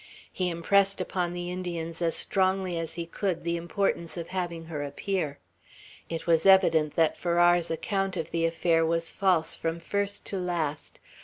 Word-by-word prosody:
He 185 -1 0
impressed 195 +4 +2
upon 180 -1 -1
the 175 0 -4
Indians 170 -2 -4
as 165 -1 +1
strongly 190 -2 0
as 165 -1 -4
he 170 0 -3
could 175 +1 -2
the 170 0 0
importance 170 0 -1
of 170 -1 -5
having 175 -3 -3
her 155 -3 -5
appear. 145 +1 -2 0.7
It 165 -1 -4
was 165 +2 +3
evident 165 -6 +5
that 160 -2 +2
Farrar's 175 0 +3
account 195 +3 -1
of 165 -1 -4
the 165 0 +1
affair 165 0 +2
was 165 0 +1
false 180 -5 +2
from 165 0 -3
first 200 +3 -2
to 195 - -3
last. 165 -5 -3
170 Hz, 165 wpm, -28 LUFS, 165-185 Hz, 0.7 s, evident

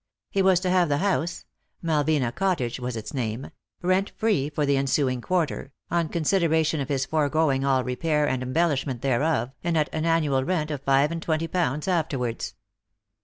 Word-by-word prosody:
He 195 - +1
was 190 -2 +4
to 185 - 0
have 180 -3 +3
the 145 - +2
house 175 -2 -1 0.2
— - - -41
Malvina 150 -5 +1
Cottage 165 -12 -1
was 125 -1 -4
its 110 -1 -7
name 120 -1 -3
— - - -52
rent 185 +2 +2
free 200 -11 +1
for 150 0 -1
the 140 0 +2
ensuing 135 -2 +1
quarter, 160 -4 -1 0.2
on 170 -2 +1
consideration 160 -2 +1
of 135 - -4
his 135 -2 0
foregoing 150 -2 +1
all 135 -2 +2
repair 150 +4 0
and 130 -2 -1
em 130 0 -4
bellishment 140 -6 0
thereof, 135 0 +1
and 170 -1 +1
at 150 -1 0
an 155 0 -1
annual 155 -5 +2
rent 155 -1 -1
of 145 -3 -4
five 140 +2 +3
and 165 0 -3
twenty 160 0 -1
pounds 160 -4 -1
afterwards. 145 -10 -1
150 Hz, 185 wpm, -25 LUFS, 135-170 Hz, 0.2 s, was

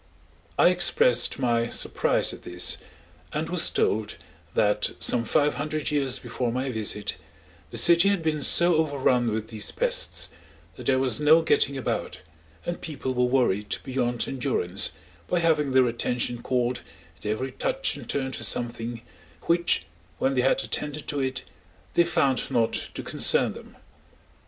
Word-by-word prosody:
I - - +6
expressed 175 -9 +3
my 120 -3 0
surprise - - +1
at - - -11
this, 90 0 -1 0.6
and 155 +2 -2
was 180 -1 +4
told 105 0 -1 0.4
that 105 -1 +2
some 115 -1 +2
five 145 +6 +1
hundred 155 +1 -3
years 140 -4 +1
before 120 -2 -4
my 130 +2 -3
visit, 105 -2 -1 0.5
the 120 - -4
city 170 - +6
had 200 -4 0
been 155 -2 -1
so 170 +4 +5
overrun 135 -6 +1
with 110 0 -4
these 110 -2 -2
pests, - - 0 0.4
that - - -9
there 130 - +3
was 130 +1 +2
no 155 +2 +5
getting 140 -3 +2
about, 130 - -4 0.4
and 175 - -4
people 135 -4 -4
were 125 0 +1
worried 120 -6 0
beyond 125 -2 -1
endurance 125 -9 0 0.4
by 180 - 0
having 155 -4 +1
their 130 -1 +4
attention 120 0 -2
called 125 -1 -1 0.4
at - - -8
every 120 +5 -2
touch 265 - -1
and 130 -5 -11
turn 135 -2 -2
to - - -5
something, 120 -1 -2 0.4
which, 170 +1 +1 0.3
when 135 - 0
they 130 - +1
had 135 - +1
attended 150 0 -2
to 145 - 0
it, 130 -1 -2 0.5
they 170 - +4
found 140 -6 0
not 115 -4 +1 0.2
to - - -5
concern - - +2
them. - - -14
130 Hz, 155 wpm, -25 LUFS, 120-155 Hz, 0.6 s, I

